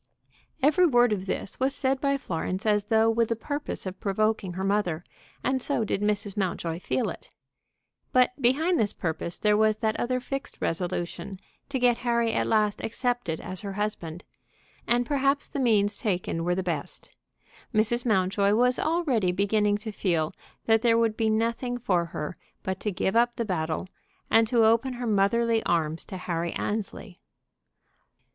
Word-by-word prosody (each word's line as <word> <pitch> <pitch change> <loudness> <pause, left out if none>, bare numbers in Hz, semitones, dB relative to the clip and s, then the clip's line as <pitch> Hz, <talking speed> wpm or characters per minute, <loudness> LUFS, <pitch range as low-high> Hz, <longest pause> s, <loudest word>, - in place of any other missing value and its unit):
Every 310 +5 +5
word 245 -5 +4
of 195 -1 -4
this 190 - -3
was 265 +2 +1
said 265 0 0
by 280 -1 +2
Florence 185 -2 -3
as 210 -1 +2
though 220 +1 +3
with 225 0 +2
the 230 - +1
purpose 285 +3 -5
of 185 0 -6
provoking 210 -1 0
her 190 +2 -4
mother; 195 -5 0 0.4
and 260 0 0
so 260 -3 0
did 205 -1 -1
Mrs. 205 -1 -1
Mountjoy 175 -4 -2
feel 240 +6 -1
it. - - -12 0.8
But 250 -1 +4
behind 310 +9 +3
this 205 -2 +1
purpose 170 0 -3
there 210 -1 +3
was 215 0 +3
that 220 0 0
other 255 +1 0
fixed 275 +2 -6
resolution 175 +2 -3 0.3
to 275 - -1
get 245 -2 +3
Harry 235 -2 +1
at - - 0
last 215 -2 +2
accepted 240 -7 -1
as 185 - -6
her 200 -2 -5
husband, 190 -5 -4 0.6
and 245 +1 +2
perhaps 280 +1 +1
the 285 - -5
means 210 -5 +3
taken 180 -5 -2
were 175 +1 +1
the 190 - -1
best. 165 -5 -5 0.6
Mrs 230 +1 +2
Mountjoy 200 -2 +2
was 250 +2 +3
already 290 - +1
beginning 205 +2 +2
to 215 +1 -6
feel 170 -6 0 0.3
that 225 -1 +4
there 230 -1 +4
would 225 -2 +2
be 220 -1 +1
nothing 230 +3 0
for 185 -8 +1
her 165 0 -5 0.3
but 190 0 -3
to 210 - -2
give 190 +2 -1
up 240 +1 +3
the 235 - -2
battle, 160 -4 -2 0.5
and 225 0 +5
to 230 -1 +4
open 230 +4 +3
her 245 0 -5
motherly 225 +2 +2
arms 165 -2 0
to 190 - -7
Harry 170 -2 -3
Annesley. 205 -2 -4
215 Hz, 170 wpm, -27 LUFS, 190-240 Hz, 0.8 s, Every